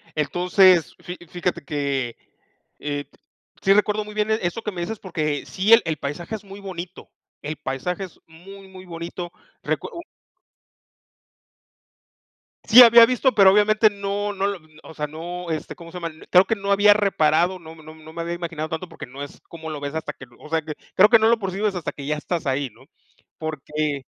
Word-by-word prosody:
Entonces, 175 Hz, +3 st, +3 dB
fi 180 Hz, +1 st, -8 dB
fíjate 175 Hz, 0 st, -3 dB
que, 140 Hz, -4 st, -2 dB, 0.6 s
eh, 145 Hz, -1 st, -4 dB, 0.6 s
sí 195 Hz, -, +5 dB
recuerdo 210 Hz, +1 st, +2 dB
muy 210 Hz, -, -10 dB
bien 210 Hz, 0 st, 0 dB
eso 220 Hz, -1 st, -1 dB
que 210 Hz, -, -3 dB
me 175 Hz, -, -6 dB
dices 210 Hz, +5 st, -4 dB
porque 155 Hz, -6 st, -3 dB
sí 200 Hz, +4 st, +2 dB
el 230 Hz, -, +8 dB
el 160 Hz, -2 st, -2 dB
paisaje 160 Hz, +10 st, -5 dB
es 210 Hz, -, -9 dB
muy 200 Hz, 0 st, -11 dB
bonito, 185 Hz, -2 st, -8 dB, 0.3 s
el 150 Hz, +1 st, -5 dB
paisaje 150 Hz, +7 st, -4 dB
es 180 Hz, -, -16 dB
muy, 190 Hz, +4 st, -14 dB
muy 185 Hz, 0 st, -13 dB
bonito. 170 Hz, 0 st, -7 dB, 0.3 s
Recu -, -, -2 dB, 2.8 s
Sí, 245 Hz, +2 st, +11 dB
había 235 Hz, 0 st, +9 dB
visto, 255 Hz, +2 st, +1 dB
pero 195 Hz, -2 st, +7 dB
obviamente 215 Hz, +2 st, +4 dB
no 205 Hz, 0 st, -3 dB
no 195 Hz, 0 st, -1 dB
lo 200 Hz, -2 st, -3 dB, 0.2 s
o -, -, -12 dB
sea, 150 Hz, -1 st, -3 dB
no, 170 Hz, +3 st, -7 dB
este, 155 Hz, -1 st, -4 dB
¿cómo 170 Hz, -1 st, -12 dB
se 180 Hz, -, -7 dB
llama? 165 Hz, -1 st, -4 dB, 0.2 s
Creo 180 Hz, +1 st, +6 dB
que 225 Hz, -, 0 dB
no 200 Hz, -1 st, -3 dB
había 205 Hz, +1 st, +6 dB
reparado, 180 Hz, -3 st, +2 dB
no 160 Hz, -2 st, -12 dB
no 155 Hz, 0 st, -13 dB
no 160 Hz, 0 st, -14 dB
me 170 Hz, -, -5 dB
había 170 Hz, +1 st, -3 dB
imaginado 165 Hz, -2 st, -5 dB
tanto 165 Hz, +3 st, -5 dB
porque 165 Hz, -4 st, -10 dB
no 135 Hz, +3 st, -8 dB
es 145 Hz, -, -11 dB
cómo 160 Hz, -1 st, -8 dB
lo 150 Hz, -2 st, -5 dB
ves 145 Hz, +1 st, -5 dB
hasta 160 Hz, -, -4 dB
que 130 Hz, -, -12 dB
o 150 Hz, -, -13 dB
sea, 160 Hz, 0 st, +1 dB
que 155 Hz, -1 st, -7 dB, 0.2 s
creo 205 Hz, +3 st, +7 dB
que 230 Hz, -, +8 dB
no 220 Hz, -, +4 dB
lo 230 Hz, 0 st, +3 dB
percibes 195 Hz, +1 st, -1 dB
hasta 175 Hz, -, -3 dB
que 140 Hz, -, -9 dB
ya 150 Hz, +1 st, -1 dB
estás 165 Hz, +2 st, -3 dB
ahí, 135 Hz, 0 st, -1 dB
¿no? -, -, -20 dB, 0.5 s
Porque 150 Hz, -2 st, -3 dB
175 Hz, 195 wpm, -23 LUFS, 155-200 Hz, 2.8 s, Sí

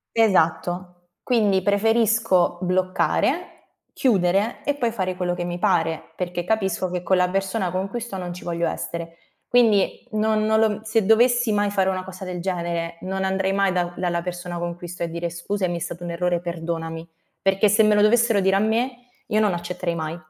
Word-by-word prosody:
Esatto. 180 Hz, -4 st, +2 dB, 0.3 s
Quindi 210 Hz, -6 st, +2 dB
preferisco 210 Hz, -3 st, +2 dB
bloccare, 185 Hz, 0 st, -1 dB, 0.2 s
chiudere 200 Hz, -2 st, +1 dB
e 285 Hz, -, +1 dB
poi 245 Hz, -5 st, 0 dB
fare 185 Hz, -5 st, -2 dB
quello 180 Hz, -1 st, -1 dB
che 175 Hz, 0 st, -4 dB
mi 175 Hz, 0 st, -4 dB
pare, 165 Hz, -5 st, 0 dB
perché 175 Hz, -1 st, -3 dB
capisco 190 Hz, -2 st, 0 dB
che 180 Hz, -1 st, -3 dB
con 185 Hz, +2 st, +2 dB
la 180 Hz, 0 st, +3 dB
persona 195 Hz, 0 st, -1 dB
con 185 Hz, +2 st, -2 dB
cui 240 Hz, +4 st, -4 dB
sto 230 Hz, -4 st, -6 dB
non 180 Hz, -2 st, -5 dB
ci 180 Hz, -, -10 dB
voglio 170 Hz, -1 st, -1 dB
essere. 170 Hz, 0 st, -5 dB, 0.3 s
Quindi 230 Hz, -3 st, +3 dB
non 215 Hz, 0 st, +1 dB
non 220 Hz, 0 st, +3 dB
lo 215 Hz, -1 st, +1 dB
se 220 Hz, -1 st, +1 dB
dovessi 240 Hz, +2 st, +4 dB
mai 205 Hz, 0 st, +1 dB
fare 195 Hz, -2 st, +1 dB
una 185 Hz, -1 st, -3 dB
cosa 190 Hz, 0 st, -9 dB
del 180 Hz, -1 st, -5 dB
genere, 170 Hz, -2 st, -3 dB
non 190 Hz, +1 st, -2 dB
andrei 190 Hz, 0 st, 0 dB
mai 195 Hz, -1 st, +2 dB
da 175 Hz, -1 st, -1 dB
dalla 175 Hz, -1 st, -1 dB
persona 175 Hz, 0 st, -5 dB
con 170 Hz, 0 st, -4 dB
cui 175 Hz, 0 st, -9 dB
sto 175 Hz, 0 st, -7 dB
a -, -, 0 dB
dire: 170 Hz, +1 st, -4 dB
"Scusami, 175 Hz, +1 st, -2 dB
è -, -, -5 dB
stato 170 Hz, +1 st, -5 dB
un 175 Hz, -, -4 dB
errore, 175 Hz, 0 st, 0 dB
perdonami." 165 Hz, -1 st, -5 dB, 0.3 s
Perché 195 Hz, +2 st, +3 dB
se 210 Hz, +2 st, +4 dB
me 215 Hz, -1 st, +4 dB
lo 210 Hz, -, +4 dB
dovessero 225 Hz, 0 st, +4 dB
dire 195 Hz, 0 st, +3 dB
a -, -, +4 dB
me, 240 Hz, +4 st, -1 dB, 0.2 s
io 215 Hz, -, +2 dB
non 210 Hz, -3 st, +3 dB
accetterei 175 Hz, 0 st, -3 dB
mai. 160 Hz, 0 st, -4 dB
185 Hz, 195 wpm, -23 LUFS, 175-215 Hz, 0.3 s, dovessi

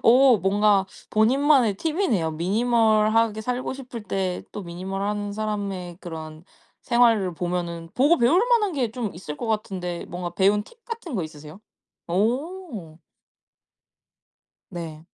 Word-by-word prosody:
어 255 Hz, +1 st, +7 dB
뭔가 200 Hz, 0 st, +3 dB, 0.2 s
본인만의 250 Hz, +1 st, +4 dB
팁이네요. 300 Hz, -, 0 dB
minimal 215 Hz, +5 st, +2 dB
하게 225 Hz, -1 st, +2 dB
살고 250 Hz, +3 st, -2 dB
싶을 250 Hz, -4 st, -8 dB
때 190 Hz, -3 st, -2 dB
또 -, -, -5 dB
minimal 185 Hz, +2 st, -5 dB
한 205 Hz, 0 st, -2 dB
사람의 200 Hz, -4 st, -4 dB
그런 160 Hz, -2 st, -8 dB, 0.4 s
생활을 230 Hz, -7 st, +3 dB
보면은 170 Hz, -1 st, -3 dB
보고 295 Hz, +6 st, +4 dB
배울 265 Hz, +10 st, +4 dB
만한 440 Hz, -5 st, +3 dB
게 255 Hz, -7 st, -1 dB
좀 230 Hz, -3 st, -4 dB
있을 155 Hz, -4 st, -7 dB
것 235 Hz, -, -5 dB
같은데 190 Hz, -5 st, -3 dB
뭔가 175 Hz, 0 st, -5 dB
배운 200 Hz, +3 st, +3 dB
팁 465 Hz, -, -20 dB
같은 455 Hz, -, -6 dB
거 190 Hz, -, 0 dB
있으세요? 155 Hz, +3 st, -10 dB, 0.5 s
오. 230 Hz, -, -2 dB, 1.7 s
네. 165 Hz, -3 st, -7 dB
210 Hz, 290 characters per minute, -24 LUFS, 180-245 Hz, 1.7 s, 어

